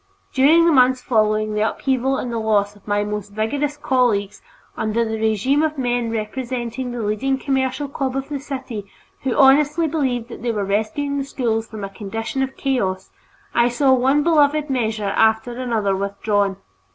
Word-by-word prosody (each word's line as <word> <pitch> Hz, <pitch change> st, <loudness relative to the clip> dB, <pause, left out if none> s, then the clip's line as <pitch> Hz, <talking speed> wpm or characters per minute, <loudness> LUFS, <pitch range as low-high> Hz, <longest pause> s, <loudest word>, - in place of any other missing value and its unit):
During 310 Hz, +6 st, +5 dB
the 335 Hz, -, +5 dB
months 255 Hz, -2 st, +4 dB
following 215 Hz, -3 st, +1 dB
the 210 Hz, -, 0 dB
upheaval 265 Hz, +4 st, 0 dB
and 240 Hz, -, -4 dB
the 230 Hz, -, -1 dB
loss 210 Hz, -2 st, +1 dB
of 205 Hz, -, -22 dB
my 205 Hz, 0 st, +1 dB
most 210 Hz, -1 st, -5 dB
vigorous 285 Hz, +8 st, -1 dB
colleagues, 245 Hz, -8 st, 0 dB, 0.3 s
under 220 Hz, +2 st, 0 dB
the 220 Hz, 0 st, -3 dB
regime 220 Hz, +6 st, +2 dB
of 310 Hz, -1 st, -1 dB
men 245 Hz, -2 st, 0 dB
representing 240 Hz, +2 st, -4 dB
the 240 Hz, -2 st, -4 dB
leading 245 Hz, +6 st, 0 dB
Commercial 265 Hz, +1 st, -1 dB
Club 270 Hz, -1 st, -3 dB
of 270 Hz, 0 st, -3 dB
the 290 Hz, -2 st, -4 dB
city 260 Hz, -7 st, -6 dB, 0.3 s
who 260 Hz, -2 st, -1 dB
honestly 295 Hz, +4 st, +5 dB
believed 260 Hz, -7 st, -1 dB
that -, -, -9 dB
they 240 Hz, 0 st, -1 dB
were 205 Hz, -3 st, -2 dB
rescuing 220 Hz, +8 st, -1 dB
the -, -, -1 dB
schools 230 Hz, -5 st, -2 dB
from 215 Hz, -2 st, -8 dB
a 195 Hz, -, -4 dB
condition 225 Hz, +7 st, -4 dB
of 265 Hz, 0 st, -3 dB
chaos, 195 Hz, -9 st, -1 dB, 0.4 s
I 240 Hz, 0 st, +3 dB
saw 265 Hz, +2 st, +3 dB
one 265 Hz, +3 st, +3 dB
beloved 300 Hz, -2 st, +3 dB
measure 220 Hz, -5 st, -1 dB
after 220 Hz, +2 st, +3 dB
another 225 Hz, -6 st, 0 dB
withdrawn. 200 Hz, 0 st, -1 dB
245 Hz, 175 wpm, -21 LUFS, 215-270 Hz, 0.4 s, During